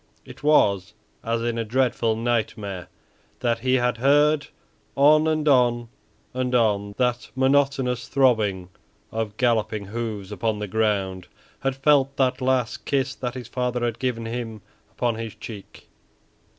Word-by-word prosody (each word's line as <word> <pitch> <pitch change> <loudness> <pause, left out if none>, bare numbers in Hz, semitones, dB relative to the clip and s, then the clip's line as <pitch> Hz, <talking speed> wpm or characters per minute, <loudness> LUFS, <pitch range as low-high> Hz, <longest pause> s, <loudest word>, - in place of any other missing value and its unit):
It - - -12
was 105 -9 +3 0.3
as 115 0 -1
in 120 0 -1
a - - 0
dreadful 115 -1 +1
nightmare 110 -5 -2 0.5
that 120 -2 +1
he 130 +2 +1
had 125 -1 +1
heard 145 +4 +3 0.5
on 155 +3 +5
and 155 -1 0
on 120 -4 +3 0.4
and 125 0 -1
on 100 -3 +1
that 125 -1 0
monotonous 130 -2 +1
throbbing 105 -9 +2 0.4
of 110 -2 -3
galloping 110 -4 +1
hoofs 105 -2 -5
upon 105 +2 -1
the 105 - -3
ground; 95 -3 -1 0.3
had 135 -1 -1
felt 135 0 +3
that 130 -2 +1
last 130 -2 0
kiss 135 -1 0
that 125 -1 -5
his 125 -3 -7
father 125 -1 -1
had 120 -1 -3
given 120 -3 -2
him 115 -2 -5 0.3
upon 120 -2 -1
his 115 -1 -6
cheek. 105 -2 -10
120 Hz, 140 wpm, -24 LUFS, 110-130 Hz, 0.5 s, on